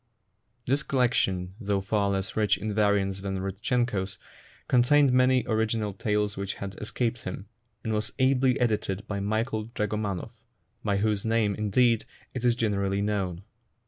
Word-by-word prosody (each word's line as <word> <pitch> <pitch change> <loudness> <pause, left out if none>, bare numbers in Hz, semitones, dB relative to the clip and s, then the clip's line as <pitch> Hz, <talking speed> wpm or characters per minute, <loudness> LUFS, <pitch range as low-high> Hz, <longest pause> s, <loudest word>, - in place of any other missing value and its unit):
This 135 +4 +2
collection, 105 -10 +1
though 100 -2 0
far 100 +1 0
less 95 0 -2
rich 105 -3 +3
in 105 +2 -3
variants 100 -2 +1
than 95 -1 -3
Rudchenko 100 +2 -1
's, 95 - -12 0.5
contained 130 +2 +4
many 130 0 +4
original 110 -2 0
tales 105 +1 0
which 100 0 -3
had 100 -1 -6
escaped 115 +1 -2
him, 95 +1 -6 0.4
and 110 - -1
was 105 +1 -1
ably 130 -1 +3
edited 105 -4 0
by 100 -1 -2
Michael 110 +2 -1
Dragomanov, 105 -1 -2 0.5
by 100 -2 +1
whose 105 0 +1
name, 110 -2 +2
indeed, 110 +3 +2 0.3
it 125 - -4
is 120 -1 +4
generally 100 -3 0
known. 95 -4 -2
105 Hz, 145 wpm, -27 LUFS, 100-115 Hz, 0.5 s, contained